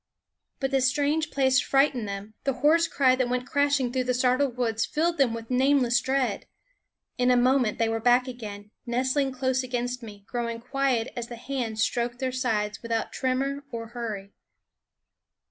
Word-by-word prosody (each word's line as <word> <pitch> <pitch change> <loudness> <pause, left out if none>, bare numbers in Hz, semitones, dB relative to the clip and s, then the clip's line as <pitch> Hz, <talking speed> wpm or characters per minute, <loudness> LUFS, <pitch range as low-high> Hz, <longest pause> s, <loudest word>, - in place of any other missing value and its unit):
But 270 -1 -1
the 270 -1 +2
strange 290 +4 +1
place 265 -3 +3
frightened 270 -4 +2
them; 200 +2 -6
the 275 - +1
hoarse 330 +2 +5
cry 260 -4 +3
that 255 -1 0
went 250 0 -1
crashing 285 -3 +1
through 255 -1 0
the 250 0 +1
startled 255 +1 +1
woods 225 -3 0
filled 335 +2 0
them 265 -4 +4
with 230 +1 -8
nameless 255 -2 +3
dread. 260 -6 -1 0.7
In 250 0 +3
a 250 - +5
moment 250 -3 +3
they 230 - +2
were 225 0 -1
back 245 +3 +3
again, 210 -4 -8 0.2
nestling 260 +3 +1
close 260 0 0
against 245 0 -3
me, 205 -3 -11
growing 235 -1 -3
quiet 255 -1 0
as 235 -1 -4
the 240 - -7
hands 235 -3 -2
stroked 240 0 -1
their 260 0 -2
sides 215 -5 -1
without 230 -1 -2
tremor 275 +2 -1
or 230 -1 -6
hurry. 220 -5 -5
250 Hz, 170 wpm, -26 LUFS, 230-270 Hz, 0.7 s, hoarse